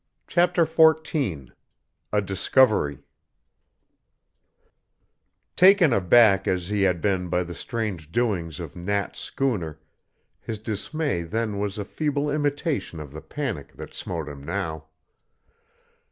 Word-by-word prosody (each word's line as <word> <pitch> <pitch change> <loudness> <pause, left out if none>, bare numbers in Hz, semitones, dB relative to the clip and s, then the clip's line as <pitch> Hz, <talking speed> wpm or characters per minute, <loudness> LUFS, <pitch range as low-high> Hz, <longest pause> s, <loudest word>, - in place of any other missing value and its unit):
CHAPTER 175 -1 +3
XIV 155 - +2 0.6
A 105 - +2
DISCOVERY 95 - +2 2.5
Taken 185 -6 +6
aback 100 0 +5
as 90 0 -1
he 105 -1 0
had 90 -3 +2
been 95 -3 0
by 90 +1 +1
the 85 0 -7
strange 95 -8 -4
doings 90 -10 -1
of - - -7
Nat's 100 +3 -2
schooner, 90 - -2 0.6
his 110 - -5
dismay 110 - -2
then 105 +4 -2
was 100 0 -2
a 105 - -3
feeble 145 +3 -1
imitation 145 - -1
of 75 -3 -8
the 80 +2 -8
panic 110 - -5
that - - -10
smote 80 -4 -5
him 70 -1 -9
now. 80 -2 -4
100 Hz, 115 wpm, -25 LUFS, 85-140 Hz, 2.5 s, Taken